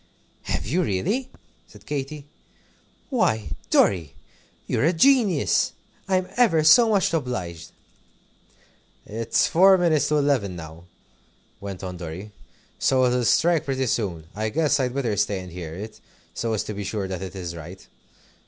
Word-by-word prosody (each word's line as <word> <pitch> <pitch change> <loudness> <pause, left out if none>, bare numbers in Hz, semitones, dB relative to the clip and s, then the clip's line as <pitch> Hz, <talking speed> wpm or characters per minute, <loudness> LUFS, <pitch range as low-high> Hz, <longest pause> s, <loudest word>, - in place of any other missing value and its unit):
"Have - - -2
you, 165 +11 0
really?" 195 - -1 0.4
said - - -17
Katy. 145 0 -5 0.9
"Why, 110 - +1 0.2
Dorry, 85 -8 +2 0.5
you're - - -1
a 165 +4 +3
genius! 205 - +3 0.3
I'm 185 -1 +1
ever 195 -11 +4
so 225 +10 +7
much 200 -5 +2
obliged." 120 - -3 1.4
"It's 115 +2 0
four 190 +3 +6
minutes 160 -5 +2
to 150 0 +2
eleven 135 -10 +1
now," 80 0 -10 0.7
went 100 -2 -7
on 90 -1 -5
Dorry. 90 +5 -7 0.5
"So 130 -1 +3
it'll 125 -1 +1
strike 165 +5 +3
pretty 135 -1 -1
soon. 95 -9 -2
I 110 +2 -2
guess 150 +2 +1
I'd 125 -1 -1
better 120 -6 -1
stay 100 0 0
and 90 -1 -9
hear 85 -2 -7
it, 105 +4 -8 0.3
so 115 -1 -2
as 110 - -1
to 105 - -6
be 100 0 -5
sure 100 -1 -3
that 95 -1 -5
it 95 -1 -7
is 90 -3 -5
right. 85 +3 -10
120 Hz, 150 wpm, -24 LUFS, 95-155 Hz, 1.4 s, so